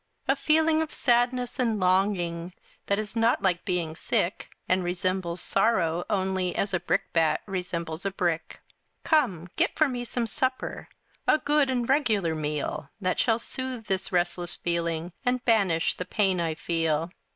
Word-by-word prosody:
A - - +4
feeling 315 0 +3
of 320 - -3
sadness 245 -1 +1
and 230 -4 +1
longing 180 -2 +1 0.3
That 200 - +2
is 215 +1 -4
not 230 +1 +2
like 180 -3 +1
being 170 -4 -1
sick, 175 +2 -1 0.2
And 185 0 +2
resembles 180 -1 -1
sorrow 175 -5 +1
only 190 -3 0
As 200 -1 -1
a 185 - +2
brickbat 165 -2 +1
resembles 175 -3 -3
a 200 - 0
brick. 175 -4 -2 0.4
Come, 180 - +1
get - - +2
for 310 - +5
me 245 -2 -3
some 240 0 -1
supper, 260 +3 -2 0.4
A - - +6
good 295 -2 +2
and 245 -2 0
regular 220 - +2
meal 150 -1 -3
That 185 -2 -1
shall 225 -2 +3
soothe 255 -1 -5
this 190 -1 -1
restless 175 -1 -1
feeling, 170 0 -2
And 250 0 0
banish 195 -9 +3
the 180 - -5
pain 190 -4 +1
I 165 -2 -1
feel. 165 0 0
190 Hz, 155 wpm, -27 LUFS, 170-235 Hz, 0.4 s, A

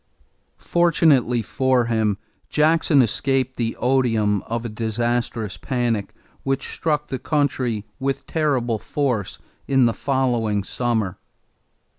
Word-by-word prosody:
Fortunately 150 -9 +3
for 130 +2 +1
him, 110 -3 +1 0.3
Jackson 155 -2 +4
escaped 130 +3 0
the 115 -1 -2
odium 115 -6 +2
of 115 +1 -3
a - - -3
disastrous 115 -1 -2
panic 120 -5 -2 0.3
which 135 0 -2
struck 150 -2 -1
the 130 - -3
country 130 -8 0
with 135 0 -2
terrible 130 -8 0
force 125 -8 -2 0.3
in 135 -2 +4
the 115 - +2
following 120 -7 0
summer. 110 -3 -1
120 Hz, 110 wpm, -22 LUFS, 115-135 Hz, 0.3 s, Jackson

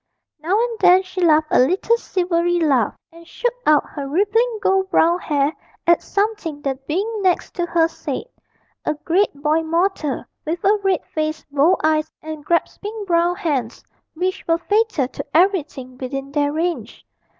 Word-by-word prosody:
Now 360 +8 +1
and 470 -1 -1
then 365 +1 +6
she 370 0 -6
laughed 310 -2 +4
a - - +4
little 365 - +3
silvery 350 -5 0
laugh, 275 -8 +1
and 335 0 -15
shook 485 +6 -2
out 300 -1 +5
her 280 -1 -6
rippling 425 - +1
gold 385 -1 +1
brown 345 -1 +3
hair 290 -2 0 0.3
at 340 0 +4
something 400 -7 -2
the 275 - 0
being 410 +7 -2
next 370 -2 +1
to 350 -1 -2
her 335 -1 +3
said 330 - -5 0.6
a - - -1
great 360 +7 +1
boy 300 +3 +1
mortal, 330 -3 -1 0.2
with 330 +2 -3
a 405 +2 +4
red 380 -4 +1
face, 310 0 -2
bold 300 +6 +3
eyes, 310 0 +2
and 310 -1 -7
grasping 410 +6 -2
brown 345 -1 +2
hands, 285 - -2 0.3
which 370 +3 -2
were 330 0 +3
fatal 415 - +1
to - - -7
everything 300 -8 +1
within 270 +1 -5
their 290 0 +1
range. 335 +3 -3
335 Hz, 160 wpm, -20 LUFS, 305-385 Hz, 0.6 s, then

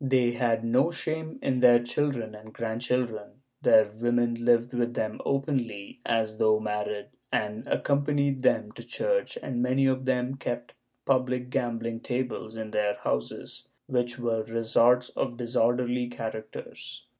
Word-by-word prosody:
They 130 -3 +3
had 115 -2 +1
no 125 +7 +3
shame 160 -2 -3
in 130 -2 +1
their 125 -1 +8
children 120 -2 -1
and 110 +1 -12
grandchildren; 115 +1 -2 0.2
their 110 -1 +6
women 120 0 +2
lived 120 +1 +2
with 120 -1 -1
them 110 -1 -2
openly, 130 -8 -2
as 110 -2 0
though 110 0 +4
married, 105 -1 -3 0.2
and 105 +4 -2
accompanied 140 -1 +1
them 130 - +2
to - - -11
church, - - -1
and 120 -2 -2
many 130 +2 +2
of 130 -1 +1
them 130 +1 0
kept 120 -2 -4 0.3
public 125 -1 +1
gam 120 -2 0
ing 115 0 -3
tables 120 -3 -3
in 110 -1 -5
their 105 -1 +1
houses, 60 -10 -4 0.2
which 120 -1 0
were 115 -2 0
resorts 115 +2 +3
of 120 -2 -3
disorderly 120 +1 +1
charac 110 -2 -5
ters. - - -9
120 Hz, 145 wpm, -28 LUFS, 115-130 Hz, 0.3 s, their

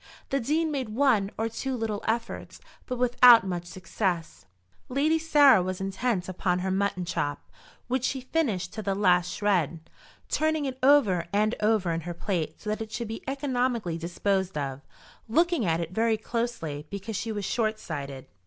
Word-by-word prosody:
The 275 - +1
Dean 310 +6 0
made 265 -6 -2
one 225 -4 +2
or 225 - 0
two 255 +3 -3
little 220 -3 -3
efforts, 230 +1 -3 0.3
but 250 - -3
without 245 -3 +7
much 175 -2 -3
success. 175 - -3 0.4
Lady 300 +5 +2
Sarah 290 - +6
was 185 0 -3
intent 195 0 -1
upon 185 -1 0
her 190 +1 -2
mutton 190 -2 0
chop, 145 -4 -3 0.4
which 255 0 -1
she 265 0 -1
finished 255 - -1
to 220 - -4
the 195 -1 -1
last 180 -3 +3
shred, 170 -6 0 0.4
turning 315 -1 0
it 260 -1 -4
over 245 -12 +4
and 210 +2 +2
over 210 -5 +2
in 165 0 -2
her 175 +1 -6
plate 165 -4 -3
so 210 - -4
that 215 - -3
it 220 -1 -6
should 235 -1 -4
be 225 - -6
economically 250 - -1
disposed 190 +2 -1
of, 135 -2 -3 0.5
looking 335 - +2
at 165 0 +1
it 165 0 -4
very 225 +2 +1
closely 215 -11 -3
because 200 +2 -5
she 225 +3 -3
was 205 -2 -3
short 220 0 0
sighted. 140 -7 -6
215 Hz, 170 wpm, -27 LUFS, 180-250 Hz, 0.5 s, without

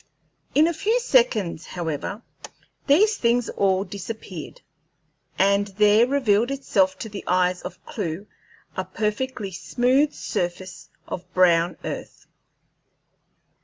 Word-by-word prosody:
In 300 - +6
a 340 - 0
few 435 +9 +1
seconds, 465 - +1
however, 175 +5 -4 0.6
these 410 +9 +4
things 235 0 +1
all 195 -1 +1
disappeared, 200 -4 -8 0.8
and 200 +1 +3
there 210 +2 +5
revealed 240 -4 +2
itself 195 -9 +1
to - - -6
the 200 -1 -7
eyes 180 0 +2
of - - -9
Clewe 185 -2 -4 0.5
a 185 - -1
perfectly 210 +3 -3
smooth 255 - +1
surface 185 -5 -4 0.2
of 180 0 -7
brown 175 -1 +4
earth. - - -7
205 Hz, 110 wpm, -24 LUFS, 185-255 Hz, 0.8 s, In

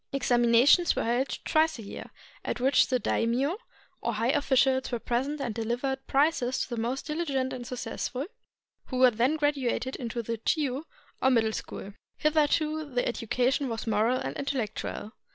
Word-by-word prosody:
Examinations 250 +5 +4
were - - 0
held 245 +4 0
twice 315 -1 +2
a 225 - -8
year, 200 - -8 0.3
at - - -3
which 260 +1 +4
the 255 - +2
daimio 255 - 0 0.4
or 235 - -1
high 230 +4 +1
officials 265 -2 +2
were 240 - 0
present 260 +6 -2
and 240 -5 -2
dehvered 240 +4 -2
prizes 270 -3 +2
to - - -2
the 235 -2 -3
most 250 +4 -2
diligent 280 -5 -1
and 245 -2 -6
successful, 250 +1 -4 0.6
who 255 - -4
were 255 -1 +6
then 240 +7 +1
graduated 275 -4 0
into 235 -2 -4
the 230 +1 -3
Chiu, 275 +4 -1 0.4
or 265 - +4
Middle 225 -3 +2
School. 200 -1 -6 0.2
Hitherto 305 0 +2
the 250 -5 -2
education 250 +4 0
was 225 -1 -4
moral 225 +3 +2
and - - -4
intellectual. 250 -5 -3
255 Hz, 160 wpm, -28 LUFS, 235-280 Hz, 0.6 s, were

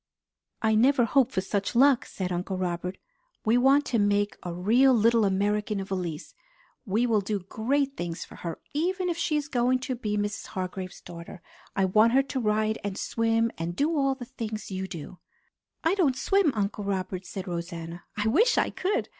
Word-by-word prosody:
"I 220 0 +3
never 245 +3 +4
hoped 260 +2 +3
for 190 - 0
such 200 +3 -2
luck!" 270 0 +5
said 185 -2 -4
Uncle 180 +2 -2
Robert. 180 0 -3 0.5
"We 220 +2 +4
want 270 +4 +4
to 235 - 0
make 205 0 +2
a 175 - -5
real 235 +10 +4
little 230 0 +4
American 205 +2 0
of 195 0 -6
Elise. 175 -4 -4 0.5
We 215 +5 +2
will 220 -4 +2
do 200 0 -2
great 270 +9 -1
things 170 -1 -4
for - - -14
her, 170 -1 -5 0.2
even 360 +4 0
if 340 - -1
she 310 -3 +1
is 290 -1 -2
going 255 -1 +2
to 260 0 -2
be 210 -4 -2
Mrs. 205 0 -3
Hargrave's 185 0 -5
daughter. 170 +1 -10 0.3
I 195 - +3
want 215 +5 +4
her 270 +1 +5
to 270 -1 -3
ride 215 -1 +1
and 200 -1 -3
swim, 230 0 +1
and 170 +1 -3
do 310 - +1
all 275 -2 +2
the 255 -2 -8
things 225 -5 -6
you 190 0 -3
do." 175 0 -8 0.6
"I 325 +3 +3
don't 310 -10 +2
swim, 390 0 +3
Uncle 205 0 -2
Robert," 190 -2 -3
said 190 +1 -6
Rosanna. 170 -1 -5
"I 210 0 0
wish 405 - +4
I - - +2
could! 385 +3 -1
215 Hz, 190 wpm, -27 LUFS, 190-260 Hz, 0.6 s, luck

